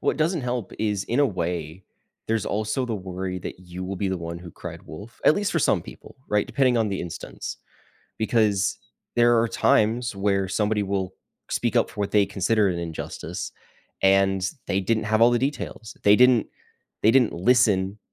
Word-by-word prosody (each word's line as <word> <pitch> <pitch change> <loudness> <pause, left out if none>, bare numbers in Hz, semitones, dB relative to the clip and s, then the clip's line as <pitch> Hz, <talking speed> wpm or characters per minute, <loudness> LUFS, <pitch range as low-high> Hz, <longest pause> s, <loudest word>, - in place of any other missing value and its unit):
what - - +1
doesn't 160 +1 +1
help 120 -4 -3
is 105 -3 0
in 120 +5 0
a 145 - +5
way, 85 - -4 0.4
there's 110 -1 0
also 110 +5 -1
the 115 - -2
worry 95 -1 -4
that 90 - -7
you 90 0 -7
will 95 +1 -4
be 100 +1 -1
the 95 - -1
one 85 0 -5
who 90 0 -10
cried - - -9
wolf, 105 +10 -11
at - - +6
least 205 0 -1
for 165 - +2
some 95 - +3
people, - - -13
right, 105 0 +1
depending 130 -1 +2
on 110 -2 +2
the 95 -2 -3
instance, 85 -1 -6 0.6
because 110 -3 +1 0.4
there 120 0 +5
are 115 - +2
times 115 +1 +2
where 100 -1 +1
somebody 105 +1 0
will 95 -1 -2 0.4
speak - - 0
up - - +3
for - - -8
what 100 - -1
they 105 -2 +4
consider 105 +2 +1
an 85 -1 -2
injustice, 80 -2 -5 0.5
and 95 -1 +3 0.2
they 95 - 0
didn't 110 +3 0
have 110 +1 +1
all 120 - +7
the 120 - +2
details, 120 -4 -4
they 105 0 +6
didn't 125 -2 +5 0.6
they 110 - +6
didn't 125 -2 +4
listen 100 -1 +2
105 Hz, 190 wpm, -24 LUFS, 95-115 Hz, 0.6 s, all